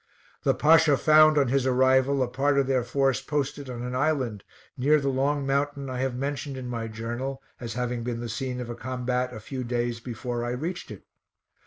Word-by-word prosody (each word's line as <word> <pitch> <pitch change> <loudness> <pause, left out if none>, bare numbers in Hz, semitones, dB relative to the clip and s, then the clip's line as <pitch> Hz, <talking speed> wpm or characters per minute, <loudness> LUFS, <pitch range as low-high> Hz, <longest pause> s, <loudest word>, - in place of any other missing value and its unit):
The - - +2
Pasha 155 -2 +5
found, 155 +1 +6
on 140 -4 +3
his 135 0 +1
arrival, 130 +1 +3
a - - -1
part 140 +3 +1
of 140 - +3
their 130 -1 +1
force 135 +1 +1
posted 145 -2 -3
on 120 -1 -5
an 125 0 -4
island 130 -7 0 0.3
near 150 +4 +3
the 140 -1 -1
long 140 +2 0
mountain 140 0 -1
I 125 - -3
have 130 -1 -1
mentioned 140 +1 -3
in 130 -1 -6
my 115 -2 -3
journal 120 +5 -5 0.2
as 115 -3 -6
having 125 -1 -2
been 120 -1 -3
the 120 - -4
scene 125 +2 -3
of 125 - -5
a - - -5
combat 125 0 -2
a 110 - -7
few 130 +4 -5
day? 120 0 -1
before 120 0 -4
I 120 0 -2
reached 165 +8 -4
it. - - -10
130 Hz, 205 wpm, -26 LUFS, 120-140 Hz, 0.3 s, found